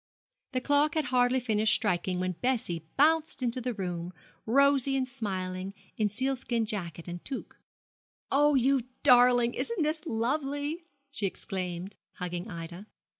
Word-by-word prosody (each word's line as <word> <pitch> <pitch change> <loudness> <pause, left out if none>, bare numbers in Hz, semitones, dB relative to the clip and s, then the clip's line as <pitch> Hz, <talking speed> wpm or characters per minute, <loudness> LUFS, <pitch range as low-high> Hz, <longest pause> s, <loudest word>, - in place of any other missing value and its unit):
The 255 - 0
clock 290 +4 +2
had 310 -2 +1
hardly 250 +1 +4
finished 215 -3 +2
striking 180 -3 0
when 185 0 0
Bessie 180 - -1
bounced 310 -1 +3
into 245 +1 0
the 245 -1 -2
room, 180 -2 -4 0.3
rosy 275 +2 +4
and 260 -1 0
smiling, 190 -6 -4 0.2
in 215 -2 +1
sealskin 245 0 -1
jacket 175 -7 -5
and 175 0 -6
toque. 265 - -6 0.8
'Oh, 295 +1 +4
you 265 -1 +3 0.2
darling! 245 -1 +6
isn't 465 -8 -1
this 310 +1 -2
lovely?' 285 +6 -1 0.3
she 215 -8 0
exclaimed, 185 0 -5 0.2
hugging 180 +2 -5
Ida. 170 +2 -7
240 Hz, 135 wpm, -29 LUFS, 185-275 Hz, 0.8 s, darling